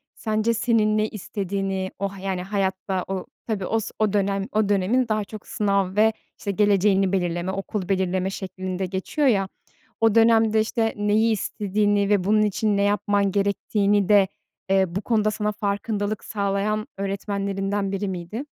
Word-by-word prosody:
sence 220 Hz, +1 st, 0 dB
senin 215 Hz, -2 st, +2 dB
ne 215 Hz, 0 st, +2 dB
istediğini, 195 Hz, -2 st, -3 dB
o, 200 Hz, 0 st, -1 dB
ha 195 Hz, -1 st, -11 dB
yani, 190 Hz, -1 st, -2 dB
hayatta, 190 Hz, -1 st, -1 dB
o, 190 Hz, -1 st, -3 dB, 0.2 s
tabii, 205 Hz, -4 st, -2 dB
os 225 Hz, +1 st, -1 dB
o 215 Hz, -2 st, +2 dB
dönem 200 Hz, 0 st, 0 dB
o 215 Hz, -1 st, +1 dB
dönemin 210 Hz, +6 st, +2 dB
daha 215 Hz, -1 st, 0 dB
çok 215 Hz, +1 st, -10 dB
sınav 200 Hz, -2 st, 0 dB
ve, 220 Hz, +1 st, +4 dB, 0.2 s
işte, 200 Hz, -, -3 dB
geleceğini 195 Hz, -1 st, +3 dB
belirleme, 175 Hz, -1 st, -1 dB
okul 195 Hz, 0 st, -4 dB
belirleme 190 Hz, -1 st, 0 dB
şeklinde 185 Hz, -1 st, -4 dB
geçiyor 190 Hz, -, -1 dB
ya, 195 Hz, -6 st, +3 dB, 0.5 s
o 225 Hz, -1 st, +4 dB
dönemde, 225 Hz, -1 st, +5 dB
işte, 225 Hz, 0 st, 0 dB
neyi 210 Hz, +2 st, +2 dB
istediğini 205 Hz, 0 st, 0 dB
ve 200 Hz, -3 st, +3 dB
bunun 215 Hz, +2 st, +3 dB
için 210 Hz, 0 st, +1 dB
ne 200 Hz, -, +2 dB
yapman 205 Hz, -1 st, +1 dB
gerektiğini 200 Hz, 0 st, +1 dB
de, 200 Hz, -2 st, +6 dB, 0.4 s
eee, 195 Hz, 0 st, +4 dB
bu 195 Hz, -, -1 dB
konuda 215 Hz, -2 st, +1 dB
sana 210 Hz, 0 st, -1 dB
farkındalık 205 Hz, 0 st, -2 dB
sağlayan 205 Hz, +1 st, -1 dB
öğretmenlerinden 195 Hz, 0 st, -2 dB
biri 200 Hz, +1 st, -2 dB
miydi? 185 Hz, +7 st, -5 dB
200 Hz, 155 wpm, -24 LUFS, 195-215 Hz, 0.5 s, de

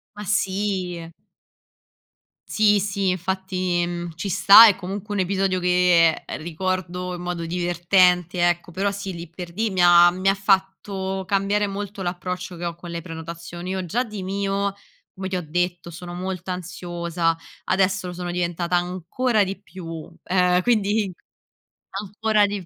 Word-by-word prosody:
Ma 210 Hz, -, -7 dB
sì. 190 Hz, -4 st, -1 dB, 1.4 s
Sì, 210 Hz, -1 st, +4 dB
sì, 195 Hz, -1 st, -1 dB
infatti 185 Hz, -1 st, -1 dB
mhmm, 175 Hz, -1 st, -4 dB
ci 185 Hz, +5 st, -4 dB
sta, 200 Hz, +5 st, +9 dB
è 205 Hz, -, +4 dB
comunque 200 Hz, +3 st, -5 dB
un 205 Hz, -, -1 dB
episodio 190 Hz, 0 st, +1 dB
che 180 Hz, -2 st, +4 dB
ricordo 180 Hz, +2 st, -3 dB
in 175 Hz, -, -6 dB
modo 175 Hz, -1 st, -4 dB
divertente, 175 Hz, 0 st, +2 dB
ecco. 175 Hz, 0 st, -1 dB
Però 195 Hz, +4 st, 0 dB
sì, 200 Hz, -1 st, -5 dB
lì 170 Hz, 0 st, -7 dB
per 175 Hz, 0 st, -8 dB
lì 220 Hz, +3 st, 0 dB
mi 185 Hz, -2 st, 0 dB
ha 175 Hz, 0 st, +8 dB
mi 185 Hz, +2 st, +1 dB
ha -, -, +4 dB
fatto 190 Hz, -1 st, -1 dB
cambiare 200 Hz, +1 st, +1 dB
molto 200 Hz, 0 st, -5 dB
l'approccio 180 Hz, 0 st, -4 dB
che 170 Hz, -, -8 dB
ho 170 Hz, -1 st, -2 dB
con 175 Hz, 0 st, -10 dB
le 170 Hz, 0 st, -4 dB
prenotazioni. 170 Hz, +2 st, -7 dB
Io 190 Hz, -1 st, -2 dB
già 245 Hz, +9 st, -1 dB
di 210 Hz, -4 st, -7 dB
mio, 195 Hz, +1 st, -1 dB, 0.4 s
come 190 Hz, -1 st, -5 dB
ti 185 Hz, -, -3 dB
ho 180 Hz, -, -3 dB
detto, 175 Hz, +1 st, -2 dB
sono 175 Hz, +1 st, -8 dB
molto 185 Hz, 0 st, -4 dB
ansiosa. 175 Hz, -2 st, -2 dB, 0.3 s
Adesso 190 Hz, 0 st, +1 dB
lo 180 Hz, -, -5 dB
sono 175 Hz, 0 st, -4 dB
diventata 175 Hz, 0 st, 0 dB
ancora 185 Hz, +6 st, 0 dB
di 195 Hz, +1 st, -5 dB
più. 165 Hz, -4 st, -8 dB
Ehm, 180 Hz, -1 st, +3 dB
quindi 210 Hz, -3 st, +1 dB, 0.9 s
ancora 210 Hz, +1 st, +1 dB
di 200 Hz, -3 st, -5 dB
185 Hz, 155 wpm, -23 LUFS, 175-195 Hz, 1.4 s, sta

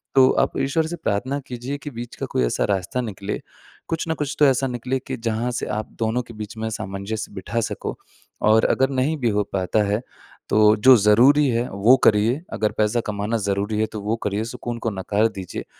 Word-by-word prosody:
तो 130 Hz, -1 st, +7 dB
आप -, -, +1 dB
ईश्वर 155 Hz, +4 st, +1 dB
से 175 Hz, -, -4 dB
प्रार्थना 130 Hz, +1 st, -2 dB
कीजिए 125 Hz, +3 st, -5 dB
कि 145 Hz, -, -7 dB
बीच 120 Hz, 0 st, -8 dB
का -, -, -4 dB
कोई -, -, +1 dB
ऐसा -, -, 0 dB
रास्ता 100 Hz, +5 st, -1 dB
निकले, 105 Hz, -3 st, -4 dB, 0.5 s
कुछ 165 Hz, 0 st, -2 dB
न -, -, +2 dB
कुछ 145 Hz, -2 st, -3 dB
तो 150 Hz, -, +7 dB
ऐसा 135 Hz, 0 st, +2 dB
निकले 125 Hz, +1 st, -2 dB
कि 130 Hz, -, -2 dB
जहाँ 115 Hz, +1 st, -1 dB
से 120 Hz, -, -3 dB
आप 110 Hz, 0 st, -3 dB
दोनों 115 Hz, +2 st, 0 dB
के 115 Hz, -, -12 dB
बीच 105 Hz, 0 st, -7 dB
में 110 Hz, 0 st, -2 dB
सामंजस्य 105 Hz, +1 st, -5 dB
बिठा 115 Hz, +5 st, -3 dB
सको, -, -, -4 dB, 0.5 s
और 110 Hz, +1 st, +4 dB
अगर 135 Hz, 0 st, +2 dB
नहीं 135 Hz, +3 st, 0 dB
भी 120 Hz, -5 st, +1 dB
हो 105 Hz, -1 st, +1 dB
पाता 95 Hz, +3 st, +1 dB
है, 105 Hz, +2 st, 0 dB, 0.5 s
तो 105 Hz, 0 st, +5 dB
जो 130 Hz, +5 st, +7 dB
ज़रूरी 125 Hz, +8 st, +5 dB
है, 120 Hz, +1 st, 0 dB
वो 100 Hz, +6 st, +5 dB
करिए। 110 Hz, +7 st, +3 dB
अगर 105 Hz, -1 st, 0 dB
पैसा 110 Hz, +2 st, +2 dB
कमाना 105 Hz, +2 st, -1 dB
ज़रूरी 100 Hz, +1 st, -1 dB
है 110 Hz, -, +3 dB
तो 105 Hz, -, -4 dB
वो 105 Hz, +3 st, -1 dB
करिए, 105 Hz, +1 st, -1 dB
सुकून 120 Hz, 0 st, -5 dB
को 115 Hz, -, -1 dB
नकार 100 Hz, +3 st, +1 dB
दीजिए। 95 Hz, -2 st, -6 dB
110 Hz, 210 wpm, -22 LUFS, 105-125 Hz, 0.5 s, तो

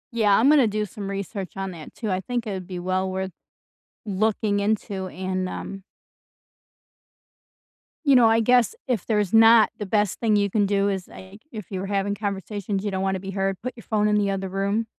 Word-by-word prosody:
Yeah, 210 Hz, -3 st, +4 dB
I'm 240 Hz, -, +4 dB
gonna 285 Hz, -5 st, +6 dB
do 210 Hz, 0 st, -1 dB
some 200 Hz, -1 st, -7 dB
research 195 Hz, -1 st, -5 dB
on 195 Hz, 0 st, -3 dB
that 165 Hz, -4 st, -10 dB
too, 220 Hz, -4 st, -3 dB
I 185 Hz, -, 0 dB
think 240 Hz, +3 st, -3 dB
it 215 Hz, -, -4 dB
would 185 Hz, -2 st, -5 dB
be 185 Hz, -2 st, -6 dB
well 185 Hz, +1 st, -1 dB
worth 190 Hz, 0 st, -3 dB, 0.7 s
looking 205 Hz, 0 st, 0 dB
into 200 Hz, -2 st, -1 dB
and, 185 Hz, 0 st, -3 dB
um 195 Hz, +1 st, -6 dB, 2.2 s
you 280 Hz, -2 st, +5 dB
know, 240 Hz, -2 st, +7 dB
I 225 Hz, +1 st, +4 dB
guess 245 Hz, -, +3 dB
if 240 Hz, -7 st, -1 dB
there's 210 Hz, -3 st, 0 dB
not, 225 Hz, 0 st, +7 dB
the 210 Hz, -, -3 dB
best 205 Hz, -1 st, 0 dB
thing 220 Hz, -2 st, +2 dB
you 200 Hz, -1 st, +2 dB
can 205 Hz, +1 st, +2 dB
do 200 Hz, 0 st, +1 dB
is, 190 Hz, -2 st, -3 dB
like, 190 Hz, +3 st, -13 dB
if 215 Hz, -5 st, -8 dB
you 190 Hz, -, -3 dB
were 190 Hz, -, -4 dB
having 200 Hz, 0 st, -1 dB
conversations, 200 Hz, -1 st, -3 dB
you 205 Hz, -, -2 dB
don't 190 Hz, 0 st, -2 dB
wanna 190 Hz, 0 st, 0 dB
be 195 Hz, 0 st, -6 dB
heard, 195 Hz, 0 st, -1 dB
put 255 Hz, 0 st, -3 dB
your 230 Hz, -, -11 dB
phone 210 Hz, -1 st, +1 dB
in 210 Hz, -, +2 dB
the 205 Hz, -1 st, +2 dB
other 195 Hz, -1 st, -3 dB
room. 200 Hz, +4 st, -1 dB
200 Hz, 210 wpm, -24 LUFS, 190-220 Hz, 2.2 s, know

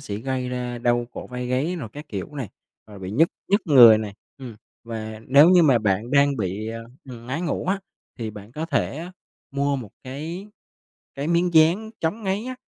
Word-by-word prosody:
sẽ 100 Hz, -, -5 dB
gây 130 Hz, +2 st, -3 dB
ra 125 Hz, -1 st, -4 dB
đau 120 Hz, 0 st, +1 dB
cổ -, -, -7 dB
vai 125 Hz, 0 st, -5 dB
gáy 135 Hz, +8 st, -1 dB
rồi 135 Hz, -10 st, -6 dB
các 150 Hz, +1 st, -8 dB
kiểu 100 Hz, +8 st, -6 dB
này, 135 Hz, -7 st, -4 dB, 0.4 s
rồi 105 Hz, -2 st, -12 dB
bị 95 Hz, -1 st, -6 dB
nhức 155 Hz, +11 st, +4 dB, 0.2 s
nhức 200 Hz, +2 st, +3 dB
người 120 Hz, -8 st, +9 dB
nè. 105 Hz, -2 st, -5 dB, 0.3 s
Ừm, 125 Hz, -5 st, -9 dB, 0.3 s
và 110 Hz, -1 st, -6 dB
nếu 140 Hz, +5 st, +7 dB
như 180 Hz, -2 st, +6 dB
mà 135 Hz, -6 st, +5 dB
bạn 105 Hz, +2 st, 0 dB
đang 140 Hz, 0 st, +4 dB
bị, 105 Hz, +1 st, -3 dB
à, 115 Hz, 0 st, -5 dB, 0.3 s
ừm, 120 Hz, -1 st, -10 dB
ngáy 130 Hz, +6 st, -3 dB
ngủ 165 Hz, -, -2 dB
á, 190 Hz, +2 st, +1 dB, 0.4 s
thì 115 Hz, -2 st, -4 dB
bạn 105 Hz, +1 st, -12 dB
có 155 Hz, +4 st, -4 dB
thể 165 Hz, +2 st, -2 dB, 0.4 s
mua 140 Hz, 0 st, 0 dB
một 120 Hz, -7 st, -7 dB
cái 160 Hz, +9 st, -6 dB, 0.7 s
cái 140 Hz, +3 st, -3 dB
miếng 170 Hz, +1 st, +1 dB
dán 170 Hz, +8 st, +4 dB
chống 170 Hz, +8 st, -2 dB
ngáy 195 Hz, +2 st, -1 dB
á, 255 Hz, +1 st, -5 dB
130 Hz, 205 wpm, -23 LUFS, 115-160 Hz, 0.7 s, người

